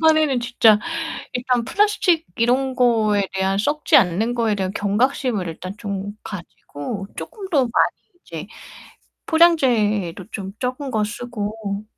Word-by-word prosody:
판에는 310 Hz, -5 st, +4 dB
진짜 235 Hz, -3 st, +4 dB, 0.5 s
일단 250 Hz, -1 st, 0 dB
플라스틱 360 Hz, -, +2 dB
이런 255 Hz, +3 st, +1 dB
거에 220 Hz, -5 st, +2 dB
대한 190 Hz, +1 st, 0 dB
썩지 300 Hz, -, +3 dB
않는 220 Hz, +2 st, +2 dB
거에 230 Hz, -3 st, +1 dB
대한 190 Hz, -2 st, -2 dB
경각심을 210 Hz, -1 st, 0 dB
일단 185 Hz, +4 st, -7 dB
좀 200 Hz, -1 st, -4 dB
가지고 195 Hz, +1 st, -7 dB
쪼끔 400 Hz, -4 st, -7 dB
더 290 Hz, -7 st, +4 dB
많이 240 Hz, -, -3 dB, 0.6 s
이제 -, -, -7 dB, 0.8 s
포장재도 225 Hz, -, +3 dB
좀 195 Hz, -2 st, -6 dB
적은 260 Hz, +2 st, -3 dB
거 215 Hz, -3 st, +1 dB
쓰고 210 Hz, -2 st, -5 dB
230 Hz, 260 characters per minute, -21 LUFS, 200-265 Hz, 0.8 s, 판에는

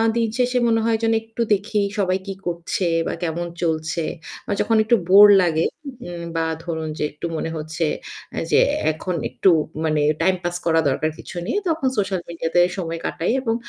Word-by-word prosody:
দিন 230 Hz, -1 st, +1 dB
শেষে 250 Hz, 0 st, +1 dB
মনে 225 Hz, -1 st, +3 dB
হয় 230 Hz, -1 st, +2 dB
যেন 225 Hz, 0 st, +3 dB
একটু 225 Hz, +1 st, -6 dB
দেখি 205 Hz, +1 st, 0 dB, 0.2 s
সবাই 185 Hz, -1 st, +2 dB
কি 195 Hz, -, -3 dB
করছে 175 Hz, +2 st, -2 dB, 0.2 s
বা -, -, -2 dB
কেমন 170 Hz, +1 st, -2 dB
চলছে। 160 Hz, -1 st, -1 dB, 0.4 s
বা -, -, -3 dB
যখন 225 Hz, -, +2 dB
একটু 235 Hz, +2 st, +4 dB
বোর 200 Hz, +2 st, +10 dB
লাগে 165 Hz, -2 st, +1 dB, 0.7 s
বা 165 Hz, -, +1 dB, 0.2 s
ধরুন 160 Hz, -2 st, -3 dB
যে -, -, -2 dB
একটু 150 Hz, -, -7 dB
মনে 165 Hz, -, -3 dB
হচ্ছে 155 Hz, +2 st, -3 dB, 0.7 s
যে -, -, +5 dB, 0.3 s
এখন 175 Hz, +3 st, -4 dB
একটু 190 Hz, -, +2 dB, 0.4 s
মানে 155 Hz, -1 st, +1 dB, 0.2 s
টাইম 185 Hz, +2 st, +3 dB
পাস 175 Hz, 0 st, -2 dB
করা 165 Hz, -1 st, +3 dB
দরকার 155 Hz, +3 st, 0 dB
কিছু -, -, -10 dB
নেই। -, -, -2 dB
তখন 315 Hz, -4 st, 0 dB
সোশ্যাল 195 Hz, -3 st, 0 dB
মিডিয়াতে 170 Hz, 0 st, 0 dB, 0.2 s
সময় 165 Hz, -3 st, -3 dB
কাটাই 165 Hz, -, -1 dB
এবং 225 Hz, -3 st, 0 dB
175 Hz, 175 wpm, -22 LUFS, 165-215 Hz, 0.7 s, বোর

